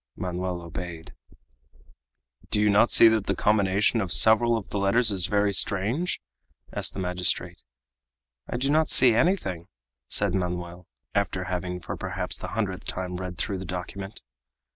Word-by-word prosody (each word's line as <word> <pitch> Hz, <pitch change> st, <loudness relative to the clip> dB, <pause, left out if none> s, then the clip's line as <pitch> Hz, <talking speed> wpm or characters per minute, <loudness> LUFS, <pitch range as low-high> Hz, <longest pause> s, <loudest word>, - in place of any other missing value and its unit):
Manoel 90 Hz, -1 st, -4 dB
obeyed. 85 Hz, -1 st, -8 dB, 1.4 s
"Do 105 Hz, -, 0 dB
you 105 Hz, 0 st, +3 dB
not 105 Hz, +4 st, +4 dB
see 115 Hz, -, +7 dB
that 110 Hz, -3 st, 0 dB
the 100 Hz, -, 0 dB
combination 105 Hz, +2 st, +2 dB
of 95 Hz, -4 st, -3 dB
several 115 Hz, +3 st, +5 dB
of 105 Hz, -, -8 dB
the 100 Hz, -, -3 dB
letters 110 Hz, +4 st, +3 dB
is 95 Hz, -2 st, +3 dB
very 100 Hz, 0 st, +1 dB
strange?" 110 Hz, -, 0 dB, 0.5 s
asked -, -, -3 dB
the -, -, -5 dB
magistrate. 90 Hz, -1 st, +1 dB, 0.9 s
"I -, -, -3 dB
do 135 Hz, +3 st, 0 dB
not 155 Hz, +1 st, +2 dB
see 125 Hz, -3 st, +6 dB
anything," 110 Hz, -, 0 dB, 0.4 s
said 100 Hz, -3 st, 0 dB
Manoel, 90 Hz, -1 st, -4 dB, 0.3 s
after -, -, -1 dB
having 90 Hz, 0 st, -4 dB
for -, -, -6 dB
perhaps 95 Hz, -1 st, -4 dB
the -, -, -6 dB
hundredth 95 Hz, -4 st, -3 dB
time 90 Hz, -1 st, -4 dB
read 90 Hz, -1 st, -6 dB
through 95 Hz, +4 st, -3 dB
the -, -, -6 dB
document. 90 Hz, -, -7 dB
95 Hz, 155 wpm, -25 LUFS, 90-110 Hz, 1.4 s, see